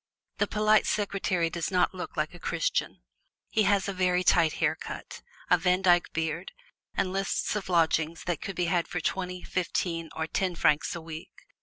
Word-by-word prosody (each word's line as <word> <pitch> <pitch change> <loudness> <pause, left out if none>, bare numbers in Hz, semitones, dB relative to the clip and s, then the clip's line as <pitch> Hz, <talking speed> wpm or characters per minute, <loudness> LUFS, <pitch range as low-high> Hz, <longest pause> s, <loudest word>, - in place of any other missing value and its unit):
The - - +2
polite 215 0 +3
Secretary 195 -4 0
does 170 -2 -2
not 185 0 +2
look 180 -2 -7
like 150 +2 -1
a 175 - -11
Christian: - - -1 0.5
he 220 - +2
has 200 -1 +2
a 200 - -2
very 180 -1 +2
tight 165 -3 +4
hair - - +1
cut, - - -8 0.3
a 180 - +6
Vandyke 180 0 +3
beard 160 - -3 0.4
and 185 - 0
lists 195 +2 -1
of 200 -3 -4
lodgings 165 -1 +2
that 175 -4 -2
can 195 - -5
be 175 - 0
had 170 0 +1
for 180 - -3
twenty, 180 +1 -3
fifteen 170 -2 -2
or 160 - -1
ten 180 +2 -1
francs 150 -1 +2
a 170 - -5
week. 160 0 -10
180 Hz, 180 wpm, -28 LUFS, 165-190 Hz, 0.5 s, a